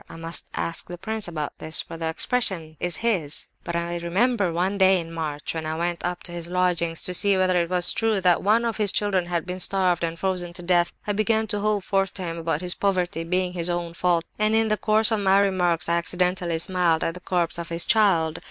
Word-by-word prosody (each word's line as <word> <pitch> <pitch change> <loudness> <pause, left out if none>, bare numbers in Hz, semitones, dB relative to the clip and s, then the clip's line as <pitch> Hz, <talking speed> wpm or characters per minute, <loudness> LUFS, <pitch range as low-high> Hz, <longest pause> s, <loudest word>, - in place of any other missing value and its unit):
I - - -10
must 165 +1 -5
ask 165 - -4
the 175 - -8
prince 215 +3 -4
about 155 -4 -5
this, 160 0 -2
for - - -10
the 165 0 -3
expression 170 -5 +1
is 175 -2 +2
his.) 170 -11 +1 0.2
But 170 - -5
I 170 0 -2
remember 195 +3 0
one 185 +4 -1
day 190 -1 +5
in 165 -1 -7
March, 150 -3 -4
when 160 -1 -4
I 155 - -3
went 170 0 -2
up 175 0 -3
to 175 - -6
his 170 -1 -6
lodgings 175 -2 0
to 180 - -3
see 200 +2 +4
whether 185 -1 +2
it 170 - -3
was 180 -1 +2
true 225 -2 +1
that 180 -2 +3
one 220 +4 +2
of 230 - -2
his 210 -3 +3
children 195 -4 0
had 170 -2 -2
been 180 0 -5
starved 185 -2 +2
and 165 0 -2
frozen 180 -2 -2
to 175 - -9
death, 175 -1 +2
I 205 - -1
began 220 +1 +1
to 205 0 0
hold 210 -1 0
forth 195 -1 -1
to 190 - -4
him 165 -1 -4
about 165 -1 -2
his 180 -1 +1
poverty 180 -4 -1
being 180 +1 -1
his 175 -1 -1
own 175 -1 -3
fault, 170 -1 0
and, 215 +1 +3
in 225 0 +3
the 215 - +3
course 215 +2 +4
of 220 - +1
my 195 0 +3
remarks, 180 -4 +1
I 170 0 +2
accidentally 180 0 0
smiled 170 -1 0
at 165 - -1
the 180 - -9
corpse 175 -2 -2
of 170 - -6
his 170 0 +1
child. 170 -8 +2
180 Hz, 240 wpm, -24 LUFS, 170-195 Hz, 0.2 s, day